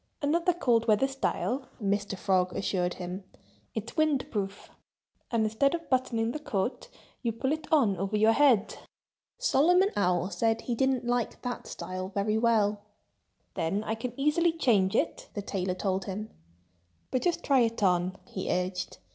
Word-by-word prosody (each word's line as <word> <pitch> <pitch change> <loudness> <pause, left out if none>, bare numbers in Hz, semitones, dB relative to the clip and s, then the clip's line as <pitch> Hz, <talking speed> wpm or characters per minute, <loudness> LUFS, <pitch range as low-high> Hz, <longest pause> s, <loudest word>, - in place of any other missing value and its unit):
"Another 335 +5 +2
cold 240 -9 +1
weather 215 +5 +4
style!" 270 -1 -2
Mr. 205 -1 -1
Frog 185 -2 +1
assured 180 -2 -1
him. 180 +2 -6 0.5
"It's 225 +1 -5
wind 300 -3 +1
proof! 200 -2 -4 0.6
And 230 -2 +1
instead 220 +8 +2
of 330 -4 -8
buttoning 235 -3 +1
the 305 - -4
coat, 225 -4 -3 0.3
you 235 - 0
pull 260 +5 -2
it 310 -1 -3
on 250 -11 +4
over 195 +2 -1
your 215 +1 +5
head." 250 -5 +3 0.6
Solomon 360 - +4
Owl 180 -1 +1
said 225 +5 +1
he 245 - -2
didn't 265 0 +1
like 240 -1 -1
that 245 -1 -4
style 185 0 -5
very 215 +2 +1
well. 215 -3 +2 0.7
"Then 185 +6 -1
I 220 - -2
can 240 +3 -5
easily 320 +4 +3
change 215 -12 +2
it," - - -1
the 205 - -3
tailor 185 -2 -2
told 190 0 -1
him. 210 +3 -5 0.8
"But 255 - +1
just 350 -2 0
try 275 -2 +4
it 230 -2 +1
on!" 180 0 +2
he 190 0 -5
urged. 180 0 -2
225 Hz, 160 wpm, -29 LUFS, 195-270 Hz, 0.8 s, your